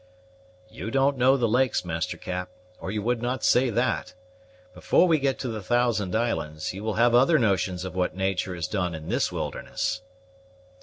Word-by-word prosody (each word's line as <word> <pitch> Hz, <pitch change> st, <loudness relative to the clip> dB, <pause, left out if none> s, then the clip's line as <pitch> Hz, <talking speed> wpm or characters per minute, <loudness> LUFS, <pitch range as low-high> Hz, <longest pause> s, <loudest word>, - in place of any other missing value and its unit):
"You 110 Hz, 0 st, -7 dB
don't 135 Hz, +3 st, +2 dB
know 130 Hz, +1 st, +4 dB
the 120 Hz, -3 st, +1 dB
lakes, 125 Hz, -2 st, +1 dB
Master 80 Hz, -2 st, -3 dB
Cap, 90 Hz, 0 st, -4 dB, 0.3 s
or -, -, -6 dB
you 105 Hz, +1 st, -2 dB
would 120 Hz, +1 st, 0 dB
not 125 Hz, +2 st, -2 dB
say 125 Hz, +1 st, +4 dB
that. 120 Hz, 0 st, -1 dB, 0.6 s
Before 185 Hz, -, +3 dB
we 160 Hz, -3 st, +3 dB
get 135 Hz, -1 st, 0 dB
to 130 Hz, -, -4 dB
the 110 Hz, -3 st, -4 dB
Thousand 110 Hz, -3 st, +1 dB
Islands, 80 Hz, -10 st, -2 dB
you 100 Hz, +2 st, -7 dB
will 110 Hz, -1 st, -2 dB
have 120 Hz, +1 st, +4 dB
other 135 Hz, +7 st, +5 dB
notions 95 Hz, -, 0 dB
of 95 Hz, -, -6 dB
what 90 Hz, -1 st, -1 dB
natur' 95 Hz, -1 st, -1 dB
has 85 Hz, -2 st, -3 dB
done 90 Hz, -4 st, -2 dB
in 80 Hz, 0 st, -8 dB
this -, -, 0 dB
wilderness." 110 Hz, -, -3 dB
110 Hz, 185 wpm, -26 LUFS, 90-125 Hz, 0.6 s, other